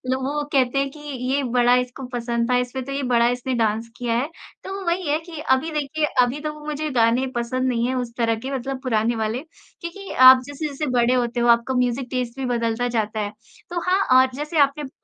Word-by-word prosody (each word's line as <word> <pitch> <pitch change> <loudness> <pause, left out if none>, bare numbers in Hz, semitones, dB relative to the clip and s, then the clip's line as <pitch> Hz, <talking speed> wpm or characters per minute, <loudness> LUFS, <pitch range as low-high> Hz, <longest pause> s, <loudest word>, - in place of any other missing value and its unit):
वो 280 +3 -2
कहते 260 -1 +2
हैं 275 0 0
कि 300 - -13
ये 275 -1 -2
बड़ा 245 0 +3
इसको 250 +1 -2
पसंद 235 0 -1
था, - - +4
इसमें 250 +1 -2
तो 275 - -6
ये 275 0 -2
बड़ा 235 -1 +4
इसने 250 +1 -2
डांस 225 0 0
किया 240 -2 -1
है। 265 +5 -1 0.3
तो 385 - -6
वो 390 -1 -6
वही 345 0 0
है 300 +2 +2
की 325 -1 -9
अभी 265 +2 +1
देखिये, 300 +1 -1 0.2
अभी 250 +4 0
तो 305 0 -3
वो 300 0 -12
मुझे 305 0 -3
गाने 240 +1 +2
पसंद 255 +2 -1
नहीं 235 -1 0
है 255 - -1
उस 245 -2 -3
तरह 230 -1 +1
के 270 - -3
मतलब 265 +1 -4
पुराने 230 -2 +1
वाले 220 +3 -2 0.4
क्योंकि 380 +4 -7
आप 255 0 +8
जैसे-जैसे 285 +1 -4
बड़े 245 0 +3
होते 240 -1 0
हो 240 - +2
आपका 235 +2 +3
म्यूज़िक 250 +1 0
टेस्ट 250 0 -3
बदलता 235 0 0
जाता 215 0 -1
है। 205 -1 -2 0.4
तो 350 0 -2
हाँ 375 +2 +3 0.2
और 260 0 +4
जैसे 300 +4 -4
आपने 280 +1 +3
प 270 - -7
255 Hz, 225 wpm, -22 LUFS, 240-285 Hz, 0.4 s, आप